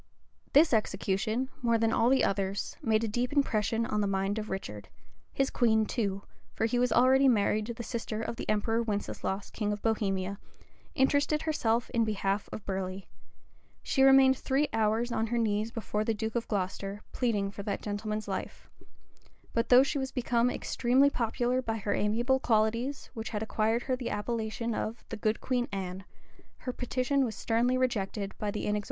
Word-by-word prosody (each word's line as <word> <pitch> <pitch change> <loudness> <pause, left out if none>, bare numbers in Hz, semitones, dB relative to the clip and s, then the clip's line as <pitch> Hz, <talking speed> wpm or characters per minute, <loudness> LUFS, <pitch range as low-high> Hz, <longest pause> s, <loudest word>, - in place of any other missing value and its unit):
This 300 0 +6
execution, 215 +4 0
more 235 -1 +3
than 225 0 +1
all 235 - +3
the 265 0 +4
others, 195 0 -1
made 220 0 +2
a - - 0
deep 240 +4 -1
impression 230 -5 +1
on 210 -3 -1
the 205 - +1
mind 195 +2 0
of 215 - -6
Richard; 105 - -6 0.4
his 270 0 0
queen 220 -3 +3
too 200 -4 -2 0.3
(for 225 - +1
he 245 +2 +1
was 250 -1 +2
already 260 +3 +5
married 215 -2 +2
to 235 - -3
the 235 - -6
sister 230 -2 -4
of 225 - -3
the - - -6
emperor 225 +2 +1
Winceslaus, 205 -2 -3
King 210 -2 -2
of 205 0 -4
Bohemia) 200 -3 -1 0.6
interested 285 +2 +2
herself 240 -7 0
in 230 - +2
behalf 205 -2 -1
of 215 - -7
Burley: 190 0 -4 0.7
she 265 - 0
remained 270 0 +7
three 280 +2 +1
hours 225 +2 +1
on 225 -1 0
her 240 +2 -1
knees 215 -1 0
before 215 -2 -2
the 225 0 0
duke 220 +1 -3
of 235 -1 -2
Glocester, 195 0 -3
pleading 210 -5 0
for 200 - -7
that 200 0 -3
gentleman's 215 +1 -3
life; 195 - -5 0.8
but 230 0 0
though 250 +1 +8
she 280 +1 -1
was 265 0 -3
become 240 -1 +1
extremely 260 +3 +2
popular 245 +1 0
by 225 -3 -2
her 205 -1 -1
amiable 240 +6 +1
qualities, 230 +4 0
which 225 -3 -5
had 210 -1 -3
acquired 220 +2 0
her 260 - 0
the 250 -1 -4
appellation 225 +1 -2
of 220 +2 -4
"the - - -4
good 215 +1 0
Queen 250 -1 0
Anne," 190 -1 -5 0.5
her 250 - -5
petition 255 +3 0
was 230 -4 -2
sternly 240 +3 +1
rejected 205 -5 -1
by 210 - -1
the 205 - -3
inexorable - - -6
tyrant. 210 0 0
225 Hz, 185 wpm, -30 LUFS, 210-245 Hz, 0.8 s, though